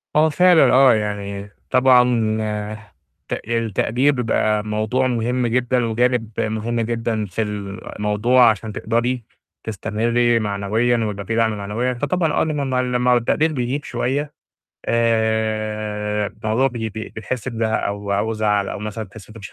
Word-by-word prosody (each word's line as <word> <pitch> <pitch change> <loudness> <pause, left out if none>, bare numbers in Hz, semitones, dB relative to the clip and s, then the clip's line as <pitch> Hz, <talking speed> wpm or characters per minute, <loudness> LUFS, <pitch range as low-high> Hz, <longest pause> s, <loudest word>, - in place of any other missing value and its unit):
آه، 155 +1 +5
فعلًا، 165 -5 +5
آه، 130 -1 +7
يعني 100 -2 -3 0.2
طبعًا 130 -1 +5 1.2
تق - - -3
التقدير 115 +4 +1
بيبقى 110 -4 0
موضوع 110 +5 0
مهم 125 0 0
جدًا، 125 0 +1
وجانب 120 0 +1
مهم 110 +2 -1
جدًا 115 -1 -1
في 100 +3 -3
الموضوع، 105 +3 +1
عشان 110 0 -2
تقدري 120 +3 -1 0.4
تستمري 115 +3 +1
معنويًا، 105 +3 0
ويبقى 100 -2 -4
في 115 +4 -2
دعم 110 -2 +1
معنويًا، 110 +5 -2
فطبعًا 150 +6 0
آه، - - +2
لمّا 140 -5 -1
لمّا 125 0 +1
والتقدير 150 +6 +1
بيغيب 130 +2 -2
شوية، 145 +3 -2 0.5
آآ 110 -2 0
الموضوع 110 +5 0
ب 135 - -2
ب 110 -2 -3 0.2
بتحسي 115 +2 -4
بزهق 110 -1 -1
أو 100 +2 -1
زعَل 105 -2 0
أو - - -5
مثلًا 105 +1 -5
بتحسي 105 +1 -14
إن - - -18
أنت 115 - -10
115 Hz, 135 wpm, -21 LUFS, 105-125 Hz, 1.2 s, آه